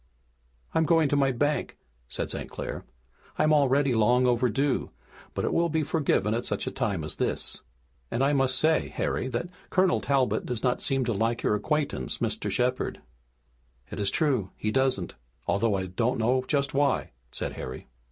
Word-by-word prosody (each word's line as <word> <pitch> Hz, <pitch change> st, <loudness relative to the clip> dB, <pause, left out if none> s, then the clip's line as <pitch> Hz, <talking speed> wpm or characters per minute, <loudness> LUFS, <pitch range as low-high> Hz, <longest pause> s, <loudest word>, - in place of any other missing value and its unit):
"I'm 160 Hz, -, +3 dB
going 165 Hz, -2 st, +4 dB
to 145 Hz, -, +2 dB
my 135 Hz, -1 st, +3 dB
bank," 145 Hz, +4 st, -1 dB, 0.3 s
said -, -, -3 dB
St. -, -, -3 dB
Clair. -, -, -5 dB, 0.5 s
"I'm 155 Hz, 0 st, +4 dB
already 140 Hz, -2 st, +3 dB
long 120 Hz, +3 st, +4 dB
overdue, 125 Hz, +3 st, +1 dB, 0.5 s
but -, -, -1 dB
it -, -, 0 dB
will 170 Hz, 0 st, +2 dB
be 160 Hz, 0 st, +1 dB
forgiven 140 Hz, -, +1 dB
at 120 Hz, +1 st, -1 dB
such -, -, -2 dB
a -, -, -2 dB
time 95 Hz, -6 st, -1 dB
as 75 Hz, -, -5 dB
this. -, -, 0 dB, 0.5 s
And 125 Hz, -, 0 dB
I 140 Hz, +2 st, +3 dB
must 135 Hz, -2 st, +2 dB
say, 155 Hz, +2 st, +3 dB
Harry, -, -, -2 dB
that 130 Hz, +7 st, -3 dB, 0.2 s
Colonel 185 Hz, -1 st, +3 dB
Talbot 135 Hz, -2 st, +1 dB
does 120 Hz, -3 st, -4 dB
not 125 Hz, -1 st, +1 dB
seem 135 Hz, -1 st, +1 dB
to 120 Hz, -, 0 dB
like 115 Hz, +3 st, 0 dB
your -, -, +2 dB
acquaintance, 105 Hz, -, -1 dB
Mr. -, -, -2 dB
Shepard." 125 Hz, +1 st, 0 dB, 0.9 s
"It -, -, -5 dB
is 100 Hz, -1 st, +1 dB
true, 130 Hz, -, +1 dB
he 105 Hz, -, -1 dB
doesn't, 130 Hz, -7 st, +1 dB, 0.3 s
although 105 Hz, +1 st, +1 dB
I 95 Hz, -1 st, -1 dB
don't 115 Hz, +7 st, 0 dB
know 125 Hz, +3 st, +1 dB
just 140 Hz, -2 st, 0 dB
why," 140 Hz, -1 st, +1 dB, 0.2 s
said -, -, -3 dB
Harry. 65 Hz, 0 st, -7 dB
130 Hz, 175 wpm, -27 LUFS, 115-145 Hz, 0.9 s, going